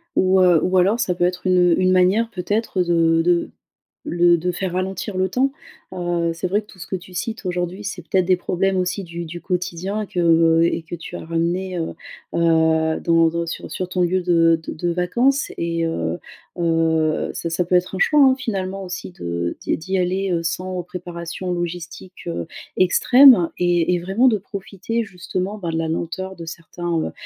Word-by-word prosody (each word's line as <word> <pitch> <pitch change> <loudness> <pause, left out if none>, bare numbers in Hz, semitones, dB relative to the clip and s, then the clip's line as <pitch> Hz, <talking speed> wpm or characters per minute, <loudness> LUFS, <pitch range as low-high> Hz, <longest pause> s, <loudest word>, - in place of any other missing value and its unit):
Ou 190 0 +4
heu, 175 -3 +5
ou 185 +1 +1
alors 200 +6 +3
ça 180 -5 0
peut 175 - -1
être 180 +1 -2
une, 185 0 +4
heu, - - +2
une 185 0 +3
manière 185 +5 +3
peut-être 205 0 -1
de 165 -1 +3
de 175 0 +2 0.6
le 175 0 +3
de 180 +2 -1
faire 180 0 -3
ralentir 190 +2 -3
le 185 0 +1
temps. 260 +7 +1 0.4
Heu, 175 -2 -1
c'est 165 +2 -3
vrai 205 +4 +1
que - - -21
tout 190 - -17
ce - - -8
que 190 - -3
tu 180 0 -10
cites 215 +4 -4
aujourd'hui, 180 +2 -3
c'est 195 -2 -5
peut-être 185 +2 +1
des 185 0 +4
problèmes 190 +2 -1
aussi 180 +2 -1
du 170 -1 -6
du 175 +1 -8
quotidien 180 +3 -3
que, 180 - -4
heu 165 -1 +4
et 170 - 0
que 175 - -6
tu 170 - -9
as - - -6
ramenés, 175 +3 -1
heu, 165 - -4 0.4
heu, 160 -1 +2
dans 165 -1 +3
dans 170 +1 -2
sur - - -6
sur 185 - -3
ton 180 0 -1
lieu 180 +1 +1
de 165 -2 +3
de - - -3
de 175 +2 -2
vacances 240 +11 +1
et, 165 0 -1
heu, 85 - -2 0.4
heu, 160 -2 +1
ça 170 - -4
ça 175 +2 +1
peut 180 +1 0
être 180 +1 +1
un - - -4
choix, 300 +8 +4
hein, 265 -1 +6
finalement, 195 -6 -4
aussi 185 0 -6
de 85 - -3
d'y - - -1
d'y 190 +4 -2
aller, 185 +1 0
heu, 170 - 0
sans 180 +2 -3
préparation 180 0 -6
logistique, 175 +1 -6
heu, 85 0 -3 0.3
extrême 240 +1 +6
et 175 -1 +2
et 175 - +1
vraiment 195 +9 +2
de 220 -4 +4
profiter, 200 +3 -4
justement, 185 +1 -4
bah, 170 -3 -4
de 160 - -2
la 165 0 -1
lenteur 185 +4 -4
de 165 - -8
certains, 175 +1 -6
heu, - - -4
180 Hz, 205 wpm, -21 LUFS, 170-190 Hz, 0.6 s, hein